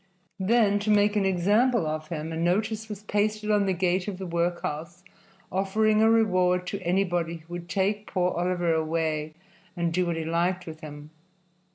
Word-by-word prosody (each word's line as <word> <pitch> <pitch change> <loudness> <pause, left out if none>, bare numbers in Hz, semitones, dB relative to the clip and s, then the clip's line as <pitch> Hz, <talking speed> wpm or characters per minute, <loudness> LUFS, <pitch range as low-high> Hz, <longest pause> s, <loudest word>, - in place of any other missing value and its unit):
Then, 205 0 +3
to 205 +1 -3
make 205 0 +4
an 205 -2 +2
example 205 +4 +2
of 155 0 -3
him, 160 -1 -5
a - - -4
notice 210 +6 0
was 210 -1 -7
pasted 210 +1 0
on 205 -1 +3
the - - +2
gate 180 +1 0
of 200 -3 -4
the 190 - -6
workhouse 170 -1 -3 0.5
offering 215 +3 +2
a 220 - +5
reward 185 -5 +3
to 200 - -4
anybody 175 -2 0
who 165 +1 -12
would 175 0 -7
take 200 +4 0
poor 180 -1 0
Oliver 175 -1 0
away 155 -1 -1 0.4
and 170 -1 0
do 180 +1 +1
what 170 - -1
he 160 - -3
liked 175 +3 0
with 160 -1 -9
him. 150 -1 -10
180 Hz, 180 wpm, -26 LUFS, 165-205 Hz, 0.5 s, a